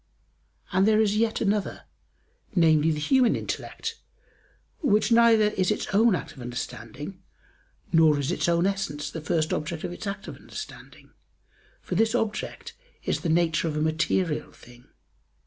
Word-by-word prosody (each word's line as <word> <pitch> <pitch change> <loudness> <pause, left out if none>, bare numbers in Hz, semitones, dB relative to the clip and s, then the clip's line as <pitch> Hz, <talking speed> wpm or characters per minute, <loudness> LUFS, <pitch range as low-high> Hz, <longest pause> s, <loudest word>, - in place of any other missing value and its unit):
And 190 +2 +3
there 215 0 +4
is 210 -1 +2
yet 225 +1 +1
another, 205 -1 -1 0.7
namely, 160 -3 +4
the 155 - 0
human 255 - +3
intellect, - - -5 0.8
which 215 -6 +2
neither 230 -2 +6
is 185 -3 0
its 210 - 0
own 220 0 +5
act - - -5
of 130 - -12
understanding, 125 - -7 0.7
nor 160 -2 +5
is 140 +2 -1
its 175 - 0
own 170 +1 +2
essence 195 -7 -2
the 160 - -6
first 155 0 0
object 160 +1 -3
of 180 - -3
its 205 - -7
act 200 0 -5
of - - -8
understanding, - - -10 0.7
for - - -5
this 225 +1 +2
object 225 -2 -3 0.3
is - - -1
the 170 - -3
nature 165 0 +2
of 155 -1 -2
a - - 0
material 160 +1 0
thing. 120 0 -17
175 Hz, 155 wpm, -26 LUFS, 155-210 Hz, 0.8 s, neither